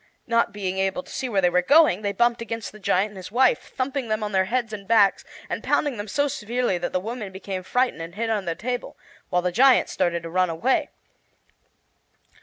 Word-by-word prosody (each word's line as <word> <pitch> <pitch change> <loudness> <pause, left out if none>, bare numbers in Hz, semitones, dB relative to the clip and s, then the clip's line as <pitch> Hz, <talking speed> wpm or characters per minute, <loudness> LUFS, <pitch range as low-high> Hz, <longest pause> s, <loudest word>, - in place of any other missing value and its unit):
Not 230 0 +2
being 190 -2 -3
able 195 +7 -1
to - - -15
see 265 -1 -3
where 200 -4 +1
they 180 - +4
were 180 +1 +3
going, 285 - +5
they 205 -1 -1
bumped 235 +3 +1
against 230 -1 -5
the 215 - -14
giant 195 +1 +1
and 205 - -13
his 185 +1 -9
wife, 255 +3 +2
thumping 265 -1 -2
them 215 0 -1
on 210 - -3
their 190 -1 +2
heads 235 +1 -2
and 200 -2 -7
backs, 210 -4 +4 0.2
and - - -4
pounding 285 -5 +1
them 205 +1 -5
so 285 +7 +1
severely 235 -5 -1
that 175 - -3
the 185 - 0
woman 215 0 -6
became 190 0 -5
frightened 250 -1 0
and 165 +2 -8
hid 225 +1 -1
under 200 -5 -1
the 165 - -2
table, 245 +5 -4 0.3
while 180 0 +1
the 180 - 0
giant 255 +7 +5
started 170 -1 -1
to 165 - -6
run 185 0 +2
away. 195 +11 0
210 Hz, 220 wpm, -24 LUFS, 185-245 Hz, 0.3 s, going